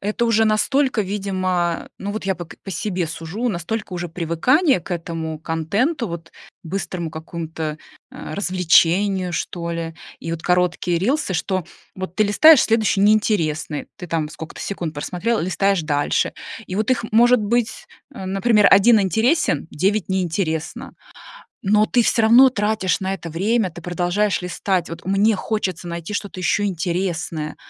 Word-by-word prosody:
это 210 +4 -1
уже 225 -1 +3
настолько, 255 +4 +2
видимо, 185 -3 -1
ну, 200 - -4
вот 215 -1 -5
я 190 - +1
по 175 - -7
к - - -14
по 195 - -6
себе 180 -3 -2
сужу, 165 +9 -4
настолько 210 +2 -4
уже 175 0 -4
привыкание 180 - +2
к 180 - -13
этому 165 -2 -4
контенту, 200 - -1
вот 170 0 -7 0.3
быстрому 175 -1 -4
какому-то, 160 -1 -5 0.3
а, 155 - -8
развлечению, 185 0 +2
что 170 0 -3
ли, 165 -1 -4 0.2
и 165 - -5
вот 165 - -5
короткие 180 -1 +1
рилсы, 255 - 0
что 185 +1 -1 0.3
вот 185 -2 -7
ты 215 - +4
листаешь 295 +8 +7
следующий 220 -3 +2
неинтересный, 185 -8 +1
ты 180 -4 -9
там 160 -2 -1
сколько-то 160 +1 -9
секунд 175 -5 -4
просмотрела, 190 +10 -2
листаешь 190 +1 +1
дальше, 145 -2 0 0.3
и 185 - -6
вот 215 +4 0
их 245 -2 +1
может 240 +1 +5
быть, 235 +2 -1 0.3
а, 190 -7 -7
например, 205 +2 +3
1 210 +3 +6
интересен, 220 - +1
9 195 +5 0
неинтересно. 180 - -2 0.8
Но 210 +1 +5
ты 245 - +2
всё 230 - +2
равно 240 +4 +7
тратишь 210 -5 0
на 190 0 -2
это 170 -2 -8
время, 195 +5 0
ты 170 +1 -11
продолжаешь 180 +4 0
листать. 180 0 -1
Вот 165 0 -8
мне 200 +3 +3
хочется 185 -4 -3
найти 170 +4 -5
что-то 200 -2 -4
еще 205 +3 +1
интересное. 170 -4 -2
185 Hz, 155 wpm, -21 LUFS, 170-215 Hz, 0.8 s, листаешь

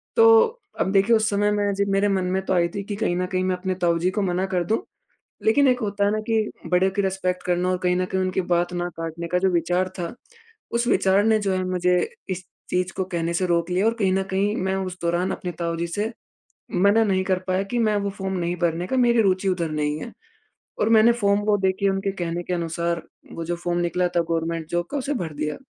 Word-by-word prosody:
तो 460 -1 +7 0.5
अब 190 - +1
देखिए 200 +4 +4
उस 220 0 +2
समय 205 0 +1
मैं 205 -1 +1
जब 200 0 0
मेरे 200 +1 +3
मन 190 -2 0
में 190 - +1
तो - - 0
आई 170 -1 +3
थी 200 - -3
कि 205 0 -5
कहीं 175 -4 0
न 180 - 0
कहीं 185 0 -1
मैं 185 0 +1
अपने 185 0 -2
ताऊ 170 -1 +2
जी 180 +2 +1
को 205 - -1
मना 185 0 0
कर 180 -2 0
दूँ, 220 - +1 0.7
लेकिन 275 +5 +4
एक 250 0 +2
होता 200 -1 0
है 205 - +2
ना 215 - 0
कि 220 -1 +1 0.2
बड़े 185 +1 +3
की 200 +1 0
रिस्पेक्ट 185 -1 -1
करना 180 0 0
और 185 - +1
कहीं 180 0 +2
न 185 0 +1
कहीं 190 0 -1
उनकी 185 0 0
बात 175 +1 +1
ना 175 0 -2
काटने 165 +1 -4
का 180 +2 0
जो 190 0 +2
विचार 180 +2 +1
था, 170 +3 -3 0.6
उस 235 +1 0
विचार 195 -2 +3
ने 220 -1 +4
जो 195 -2 0
है 185 0 0
मुझे 180 0 +2 0.3
इस 185 -1 -4 0.2
चीज़ 180 +1 -1
को 190 - +1
कहने 170 -2 -2
से 185 +2 0
रोक 170 0 +1
लिया 185 +4 +1
और 225 - +3
कहीं 190 -2 +2
न 190 0 +1
कहीं 200 +2 +1
मैं 190 +1 -1
उस 185 0 -8
दौरान 175 +2 0
अपने 180 - -4
ताऊ 170 0 -1
जी 170 +1 -2
से 210 +6 -2 0.6
मना 200 +5 +4
नहीं 190 -3 +1
कर 185 - +2
पाया 185 +1 +1
कि 240 - 0
मैं 210 - +1
वो 200 0 -1
फ़ॉर्म 190 -1 -4
नहीं 175 +1 -1
भरने 170 +1 0
का 260 - -1
मेरी 240 -2 +4
रुचि 190 -1 +2
उधर 170 -3 -1
नहीं 150 0 -1
है 235 - -7 0.7
और 215 - +3
मैंने 225 +1 +6
फॉर्म 205 -3 +2
वो 210 -1 +4
देखिए 190 +1 +1
उनके 195 +1 -1
कहने 175 -2 -3
के 180 - -2
अनुसार 170 0 -2 0.3
वो 165 - -5
जो 175 +1 -2
फ़ॉर्म 175 0 -2
निकला 180 +1 +1
था - - +5
गवर्नमेंट 165 -1 -1
जॉब 175 0 -1
का - - -1
उसे 280 +2 -2
भर 165 -9 -3
दिया। 150 +1 -3
185 Hz, 250 wpm, -23 LUFS, 175-200 Hz, 0.7 s, तो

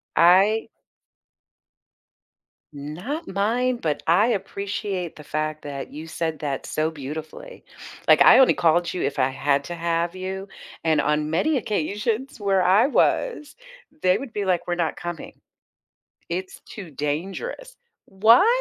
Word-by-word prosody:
I 195 +6 +4 2.0
Not 175 - -6
mine, 240 +6 0
but 150 -3 -1
I 185 +7 +4
appreciate 200 -4 -3
the 150 - -12
fact 155 0 -3
that 140 -2 -6
you 155 +2 -8
said 160 -1 -3
that 140 -3 -3
so 155 +1 -1
beautifully. 160 - -8 0.4
Like, - - +6
I - - +8
only 265 - +6
called 170 +1 +2
you 180 - -3
if 140 - -2
I 130 - +4
had 140 +1 0
to 175 - -5
have 170 +1 -1
you, 190 +1 -5 0.4
and 155 -2 +3
on 150 +1 0
many 270 - +1
occasions 215 - -2
where 195 -2 +2
I 195 +7 +5
was, 305 - 0 0.4
they 185 +1 +3
would 265 -4 -8
be 205 -2 -3
like, 180 -2 0
"We're 175 - 0
not 170 -2 -1
coming. 175 -2 -7 0.9
It's 185 +2 -5
too 195 -7 -10
dangerous." 190 - -4 0.3
What? 220 - +5
180 Hz, 140 wpm, -23 LUFS, 155-210 Hz, 2.0 s, I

